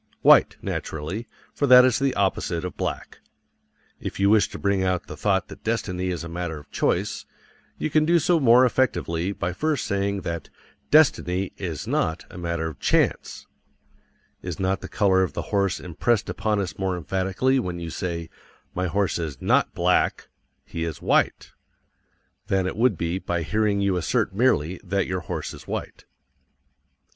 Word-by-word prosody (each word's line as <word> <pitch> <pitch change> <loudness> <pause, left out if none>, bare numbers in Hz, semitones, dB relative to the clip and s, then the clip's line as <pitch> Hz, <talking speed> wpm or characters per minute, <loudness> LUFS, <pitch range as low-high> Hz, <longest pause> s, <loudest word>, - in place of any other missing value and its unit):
White, - - +6
naturally, 80 +10 -4 0.3
for 145 - 0
that 125 0 +9
is 130 -3 +2
the 135 -1 0
opposite 90 -3 0
of 90 - -5
black. - - -4 0.8
If - - -6
you 100 +1 +4
wish 105 -3 +4
to - - -8
bring 100 -1 +1
out 95 -1 0
the 75 - -8
thought 95 +3 0
that - - -12
destiny 95 -5 -2
is 90 -2 -3
a - - -6
matter 85 -1 -4
of 75 -1 -14
choice, - - -1 0.5
you 155 - -2
can 155 +1 +4
do 170 +2 +4
so 170 +1 +3
more 125 -2 +6
effectively 100 -9 0
by 90 -2 -3
first 150 - -1
saying 100 0 -1
that 85 -3 -5 0.4
"DESTINY 100 - +3
is 85 -7 -4
NOT 80 +1 -1
a - - -10
matter 85 -1 -2
of 80 - -8
CHANCE." - - 0 1.0
Is - - -6
not 95 0 0
the - - -6
color 95 -3 +3
of 90 -6 -1
the - - -6
horse 100 -1 +1
impressed 100 +6 -1
upon 105 -1 -1
us 95 -2 -4
more 95 -2 -1
emphatically 95 - 0
when 90 -7 -3
you 85 -1 -6
say, 85 -1 -4 0.5
"My 90 +1 -1
horse 95 +1 0
is 75 -6 -4
NOT - - +2
BLACK. - - +1 0.4
He 85 - -5
is 80 -3 -4
WHITE" - - +1 1.0
than 95 -1 +1
it 95 - -3
would 115 -4 +2
be 85 +3 -2
by 85 -3 -2
hearing 105 +2 +1
you 100 -2 +1
assert 90 +2 0
merely 95 - +1
that 100 +2 0
your 90 0 -2
horse 85 - -5
is - - -12
white? - - -5
95 Hz, 170 wpm, -24 LUFS, 85-110 Hz, 1.0 s, that